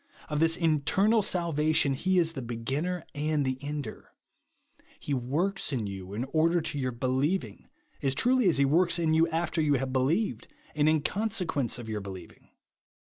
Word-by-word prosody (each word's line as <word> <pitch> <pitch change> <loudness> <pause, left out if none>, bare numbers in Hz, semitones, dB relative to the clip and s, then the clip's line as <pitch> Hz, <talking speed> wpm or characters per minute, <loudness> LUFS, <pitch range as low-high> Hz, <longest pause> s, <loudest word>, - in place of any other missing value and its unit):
Of 150 -1 -1
this 165 +1 +3
internal 180 +7 +2
salvation 155 -6 +2
he 185 +7 0
is 165 -2 +2
the 135 - -5
beginner 135 +9 -3
and 150 0 0
the 130 0 -2
ender. 145 -5 -6 0.9
He 145 - -4
w^orks 155 +10 -1
in 120 -6 -1
you, 95 0 -7
in 115 - -2
order 165 +2 +3
to 150 -3 -4
your 130 -1 -1
believing, 130 - -1 0.3
as 135 -1 0
truly 245 - +3
as 165 - +2
he 140 - +4
works 170 +5 +2
in 165 -2 +1
you 160 +1 +4
after 165 0 -1
you 145 -2 +3
have 135 0 -1
beheved, 145 +12 0 0.3
and 150 0 +3
in 155 -2 +2
consequence 190 - -1
of 120 -2 -8
your 110 -2 -3
believing. 95 -2 -10
150 Hz, 170 wpm, -28 LUFS, 130-170 Hz, 0.9 s, he